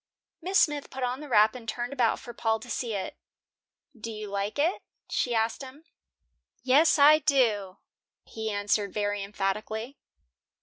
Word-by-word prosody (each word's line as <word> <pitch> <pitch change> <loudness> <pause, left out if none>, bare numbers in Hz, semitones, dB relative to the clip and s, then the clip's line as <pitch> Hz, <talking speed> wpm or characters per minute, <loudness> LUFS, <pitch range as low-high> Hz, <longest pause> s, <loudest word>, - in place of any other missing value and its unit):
Miss 375 +4 0
Smith 295 -2 +1
put 265 -1 -6
on 250 +1 -1
the 300 -1 -9
wrap 215 -2 +5
and 240 -2 -8
turned 240 +2 -4
about 245 -5 +1
for 240 - -10
Paul 225 -1 0
to 245 - -9
see 230 -2 -2
it. 190 -1 -5 0.8
"Do 230 0 -7
you 215 -1 -7
like 200 +3 -3
it?" 325 +6 +1 0.3
she 240 -2 0
asked 225 +2 0
him. 270 +3 -11 0.8
"Yes, 290 +6 +5
I 300 +2 +7
do," 230 -10 +1 0.5
he 220 0 -5
answered 205 -1 -1
very 205 -1 -1
emphatically. 210 +5 -3
230 Hz, 160 wpm, -27 LUFS, 210-270 Hz, 0.8 s, I